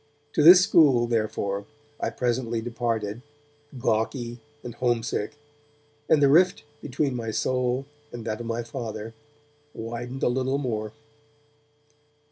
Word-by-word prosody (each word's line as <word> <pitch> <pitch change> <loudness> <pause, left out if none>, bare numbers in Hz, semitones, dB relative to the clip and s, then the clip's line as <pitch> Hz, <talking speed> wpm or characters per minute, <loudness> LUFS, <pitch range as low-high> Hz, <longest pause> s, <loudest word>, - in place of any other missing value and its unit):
To - - +2
this 180 +4 +9
school, 145 -11 +5
therefore, 105 -3 -2 0.3
I - - -1
presently 120 -2 -1
departed, 115 -2 -3 0.6
gawky 120 0 -1 0.2
and 120 - -7
homesick, 120 -1 -1 0.7
and 150 -2 +5
the - - +7
rift 175 +5 +4 0.2
between 140 0 -1
my 115 -2 -4
soul 125 +3 0 0.3
and 120 -2 -8
that 110 -1 -3
of 120 - -6
my 115 +1 -2
Father 115 -2 -6 0.6
widened 120 +3 -6
a - - +4
little 130 +2 0
more. 110 -6 -3
120 Hz, 120 wpm, -25 LUFS, 115-130 Hz, 0.7 s, this